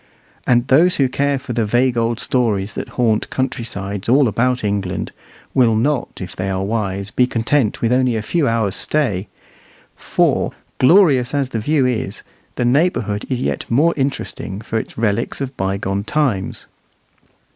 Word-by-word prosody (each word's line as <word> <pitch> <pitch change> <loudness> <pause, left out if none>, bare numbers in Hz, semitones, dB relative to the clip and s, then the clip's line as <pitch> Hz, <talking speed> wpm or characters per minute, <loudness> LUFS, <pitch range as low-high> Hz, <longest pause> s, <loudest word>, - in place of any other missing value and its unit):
And 120 0 +3
those 170 +7 +5
who 135 - +3
care 140 +2 0
for 125 -2 -6
the 115 -1 +1
vague 120 +4 +2
old 115 0 0
stories 110 -7 0
that - - -5
haunt 115 -4 +1
country 130 -2 -2
sides 100 -2 -5
all 135 +2 +5
about 125 +3 0
England, 100 -3 -2 0.4
will 120 -4 +4
not, 130 +4 -1
if 90 -1 -7
they 95 +1 -3
are 95 0 -1
wise, 100 -2 -2
be 125 +2 +2
content 115 0 0
with 115 +1 +3
only 130 -2 +2
a 110 - -2
few 155 +5 0
hours' 115 -4 0
stay; 110 -11 0 0.7
for, - - 0 0.3
glorious 140 -4 +4
as 140 -2 0
the 115 - -3
view 140 +4 +1
is, 125 -3 -2 0.3
the 125 - 0
neighbourhood 120 - +1
is 130 -2 -1
yet - - -2
more 150 +8 +3
interesting 135 -7 -3
for 110 0 -2
its - - -8
relics 110 0 0
of 135 -1 -4
bygone 95 0 -2
times. 115 -8 -1
120 Hz, 165 wpm, -19 LUFS, 105-135 Hz, 0.7 s, those